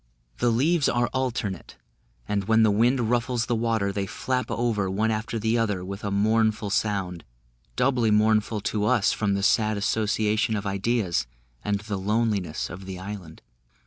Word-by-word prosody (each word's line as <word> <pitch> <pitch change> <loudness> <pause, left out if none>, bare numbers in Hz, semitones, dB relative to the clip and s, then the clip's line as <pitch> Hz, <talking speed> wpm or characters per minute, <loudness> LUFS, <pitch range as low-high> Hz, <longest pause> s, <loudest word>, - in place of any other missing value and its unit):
The 120 - +3
leaves 145 +6 +2
are 120 0 +1
alternate, 120 -8 -3 0.5
and 100 -2 -1
when 110 +1 +4
the 110 - +4
wind 120 +2 +2
ruffles 120 -1 0
the 120 - -1
water, 110 -3 0
they 100 0 -3
flap 125 +4 -2
over, 110 -5 0
one 110 +4 0
after 110 +1 -2
the 110 +2 +1
other, 105 -5 -1
with 100 +2 -7
a 100 - -1
mournful 110 +1 +1
sound, 95 -5 -1 0.5
doubly 125 -3 +2
mournful 110 0 +2
to 105 +1 -1
us 120 -3 +3
from 100 -2 0
the 100 - -2
sad 110 0 +2
association 110 +1 +1
of 105 0 -3
ideas, 100 - 0 0.4
and 100 -1 -1
the 105 -2 -4
loneliness 105 -4 -1
of 95 +3 -9
the 95 -1 -6
island. 95 -4 -8
110 Hz, 165 wpm, -25 LUFS, 100-115 Hz, 0.5 s, when